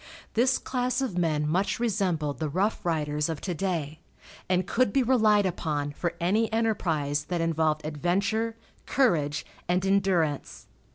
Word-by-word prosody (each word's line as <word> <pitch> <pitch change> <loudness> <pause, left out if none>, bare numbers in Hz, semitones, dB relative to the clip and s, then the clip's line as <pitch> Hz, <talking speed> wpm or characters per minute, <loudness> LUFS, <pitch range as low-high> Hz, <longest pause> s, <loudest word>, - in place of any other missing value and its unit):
This 255 +3 +3
class 250 -1 -1
of 260 -9 -2
men 155 -4 +1
much 185 +9 0
resembled 185 -10 0
the 155 -2 -1
rough 195 +8 0
riders 150 -2 0
of 160 -3 -3
to 185 - -2
day, 160 -4 -2 0.5
and 185 -1 +2
could 235 +1 +1
be 270 +2 +3
relied 215 -5 +4
upon 150 -5 -2
for 170 +4 -3
any 210 +6 +1
enterprise 160 -10 0
that 175 +1 -2
involved 160 -2 0
adventure, 200 +9 0 0.3
courage 160 - +1 0.2
and 180 +2 +1
endurance. 190 -7 0
180 Hz, 140 wpm, -27 LUFS, 155-215 Hz, 0.5 s, relied